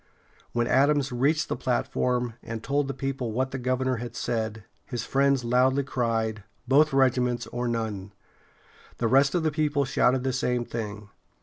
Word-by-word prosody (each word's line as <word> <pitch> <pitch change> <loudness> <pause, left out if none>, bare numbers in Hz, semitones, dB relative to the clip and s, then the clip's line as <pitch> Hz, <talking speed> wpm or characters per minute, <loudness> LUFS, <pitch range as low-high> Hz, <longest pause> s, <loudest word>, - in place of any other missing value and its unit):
] - - -31
When 120 0 +1
Adams 140 +2 +3
reached 145 +7 +1
the - - -2
platform, 125 -1 -1
and 115 -1 -6
told 140 0 0
the 135 - -3
people 135 -3 -3
what 130 +4 -1
the 135 - -4
governor 130 0 0
had 120 0 -7
said, 110 -3 -2 0.2
his 120 -2 -5
friends 140 -1 +2
loudly 130 +3 +3
cried: 115 -5 -1 0.2
"Both 150 +4 +5
regiments 125 -2 +2
or 120 0 -3
none!" 110 -4 -3 0.9
The 115 - 0
rest 135 +5 +4
of 175 - +1
the 155 - +1
people 145 -2 +1
shouted 125 0 +2
the 130 -1 0
same 125 -2 0
thing. 105 -3 -6
125 Hz, 170 wpm, -26 LUFS, 115-135 Hz, 0.9 s, Both